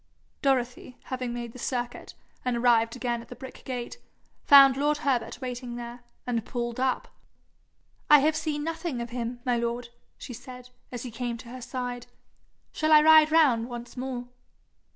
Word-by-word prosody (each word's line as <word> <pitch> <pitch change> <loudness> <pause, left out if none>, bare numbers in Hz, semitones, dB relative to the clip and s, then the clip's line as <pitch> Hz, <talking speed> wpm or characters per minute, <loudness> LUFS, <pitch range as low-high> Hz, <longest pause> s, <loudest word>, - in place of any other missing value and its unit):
Dorothy, 250 -2 -1
having 255 -2 -4
made 240 -1 -5
the 250 - -11
circuit, 245 -1 -4 0.3
and 250 -1 0
arrived 235 -1 +3
again 240 -2 -2
at - - -14
the - - -9
brick 265 - -11
gate, 245 -2 -5 0.4
found 275 -2 +8
lord 295 +2 +1
Herbert 245 -5 0
waiting 245 -1 -5
there, 240 0 -8 0.2
and 235 -3 -1
pulled 240 +1 -4
up. 260 0 0 1.0
'I 295 - +10
have 300 +2 +2
seen 305 -2 -2
nothing 325 -4 -3
of 235 0 -5
him, 240 0 -4
my 245 -1 +2
lord,' 235 +1 -3 0.3
she 250 - -8
said, 250 +1 -11 0.2
as 245 -2 -5
he 250 - -6
came 235 +1 -3
to 235 0 -12
her 255 +1 -8
side. 245 0 -5 0.6
'Shall 310 0 0
I 305 -1 +8
ride 315 0 +7
round 260 -8 +4
once 240 0 -8
more?' 250 -1 -4
250 Hz, 170 wpm, -27 LUFS, 240-265 Hz, 1.0 s, I